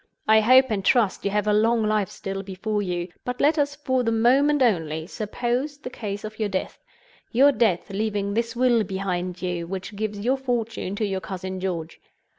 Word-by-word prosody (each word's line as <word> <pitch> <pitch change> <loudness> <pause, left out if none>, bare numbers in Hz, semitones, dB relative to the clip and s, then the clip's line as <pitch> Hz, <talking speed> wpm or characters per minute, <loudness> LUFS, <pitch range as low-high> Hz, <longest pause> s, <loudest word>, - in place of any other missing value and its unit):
I 220 0 +6
hope 255 +3 +5
and 200 -3 -1
trust 220 -2 +2
you - - +2
have 205 0 0
a 210 - +2
long 225 +2 +3
life 215 -2 +1
still 195 0 -5
before 200 +2 -3
you; 180 -2 -3
but 250 0 -4
let 305 +2 +3
us, 285 0 0
for 260 -3 0
the 230 -2 0
moment 265 +5 +4
only, 160 -8 0
suppose 240 - -2
the 255 -3 -8
case 205 -4 -5
of 215 +1 -8
your 215 -2 0
death—your 275 - -1
death 215 -9 +1
leaving 200 0 -1
this 230 +3 -1
will 240 -2 +3
behind 185 -2 -3
you, 175 -2 -2
which 190 +3 -6
gives 210 0 -3
your 250 +6 +1
fortune 230 -6 -2
to 215 - -1
your 190 -2 -2
cousin 185 0 -5
George. 170 -4 -4
215 Hz, 190 wpm, -24 LUFS, 190-245 Hz, -, I